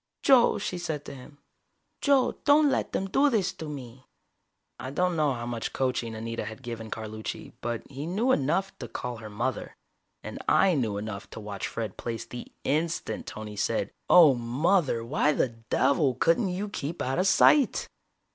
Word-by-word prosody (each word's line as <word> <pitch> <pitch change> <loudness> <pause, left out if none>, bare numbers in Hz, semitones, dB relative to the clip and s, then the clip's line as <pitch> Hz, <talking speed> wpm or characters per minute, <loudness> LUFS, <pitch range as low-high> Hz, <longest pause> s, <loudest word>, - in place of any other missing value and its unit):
"Joe," 260 -4 +5
she 180 - -3
said 155 -4 -4
to - - -7
him. 140 +2 -13 0.6
"Joe, 275 -3 +3
don't 290 0 +5
let 265 - -1
them 195 - -1
do 280 +9 +3
this 215 -8 +1
to 160 - -7
me!" 130 -3 -9 0.8
I 130 - -5
don't 180 +5 0
know 150 -3 +2
how 120 0 -5
much 120 -1 -4
coaching 125 -3 -1
Anita 115 +1 -4
had 110 +4 -8
given 115 -2 -6
Carlucci, 110 -1 -6
but 120 -1 -3
he 140 +3 -6
knew 215 +9 +1
enough 180 - +1
to 120 - -6
call 125 0 -5
her 110 -1 -9
"mother." 105 - -3 0.5
And - - -7
I 190 -2 +5
knew 115 -9 0
enough 105 -1 -6
to - - -9
watch 105 -2 -5
Fred 110 -4 -5
Plaice 115 0 -4
the 120 +1 -9
instant 160 +4 -1
Tony 110 -1 -7
said: 100 - -1 0.2
"Oh, 165 -6 +8
mother! 125 +2 +1
Why 150 +4 +2
the 135 - +1
devil 130 +4 +1
couldn't 170 - +2
you 190 +3 -3
keep 165 -4 -5
out 130 +5 -1
of 185 - +2
sight!" 280 +7 +4
135 Hz, 175 wpm, -27 LUFS, 115-180 Hz, 0.8 s, Oh